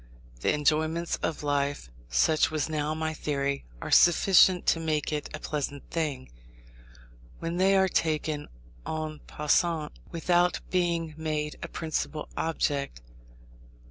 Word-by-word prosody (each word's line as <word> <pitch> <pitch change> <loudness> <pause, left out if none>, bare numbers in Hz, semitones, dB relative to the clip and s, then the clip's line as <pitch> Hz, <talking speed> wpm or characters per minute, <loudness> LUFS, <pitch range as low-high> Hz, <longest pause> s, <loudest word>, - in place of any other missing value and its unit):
The - - +2
enjoyments 155 +3 +1
of 160 -2 -3
life 140 - -1 0.2
(such 155 - +3
was 155 -2 -1
now 155 -1 -1
my 160 0 -2
theory) 140 -2 -2 0.2
are - - -5
sufficient 180 +1 +6
to 165 - +3
make 155 -2 -1
it 150 -1 -3
a 155 - -6
pleasant 145 -2 -4
thing, 150 -6 -2 1.1
when 165 +1 -3
they 195 +1 +4
are 190 0 +4
taken 155 -3 -1 0.4
en 155 -1 -4
passant, 150 +1 +1 0.2
without 175 +1 +2
being 170 -3 0
made 155 -1 -2
a - - -4
principal 155 -1 -3
object. 140 - -1
155 Hz, 125 wpm, -28 LUFS, 150-165 Hz, 1.1 s, sufficient